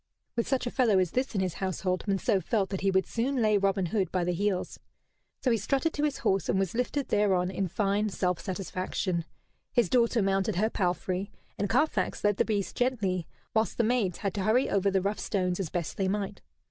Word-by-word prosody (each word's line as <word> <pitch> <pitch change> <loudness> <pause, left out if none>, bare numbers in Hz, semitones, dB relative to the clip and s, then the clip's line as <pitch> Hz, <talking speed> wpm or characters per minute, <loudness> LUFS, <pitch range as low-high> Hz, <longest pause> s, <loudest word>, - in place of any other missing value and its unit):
With 235 - 0
such 265 -2 0
a 245 - -2
fellow 235 -7 +3
as 185 -3 +2
this 255 -2 -1
in 195 - +2
his 185 -3 -1
household 185 -1 -1
Monceux 195 -1 +1
felt 200 +1 0
that 190 - -2
he 195 - +2
would 190 0 +2
soon 250 +4 -1
lay 215 -2 +3
Robin 195 -1 +2
Hood 190 +2 0
by 180 -2 0
the 180 +1 0
heels. 195 +1 -1 0.6
So 255 - +3
he 230 - +3
strutted 275 - 0
to 290 - -2
his 300 -2 +1
horse, 195 0 0
and 190 - +2
was 190 -2 0
lifted 250 +4 -1
thereon 190 -3 +2
in 190 0 -1
fine 205 +3 0
self 180 -3 -1
satisfaction. 185 -2 -2 0.5
His 235 -7 +2
daughter 235 -1 +3
mounted 195 +1 +1
her 215 +5 +1
palfrey, 185 +2 -1 0.3
and 205 - 0
Carfax 255 -11 +1
led 205 -1 +3
the - - +3
beast 205 -3 -1
gently, 205 -9 0 0.3
whilst 220 0 +1
the 235 - +3
maids 220 -6 +1
had 200 -3 -2
to 200 - -2
hurry 225 +6 +2
over 200 0 +2
the 190 -1 +1
rough 200 +2 -1
stones 180 -2 -1
as 185 -5 -2
best 170 -1 -3
they 195 - +1
might. 200 0 -2
195 Hz, 215 wpm, -29 LUFS, 185-225 Hz, 0.6 s, fellow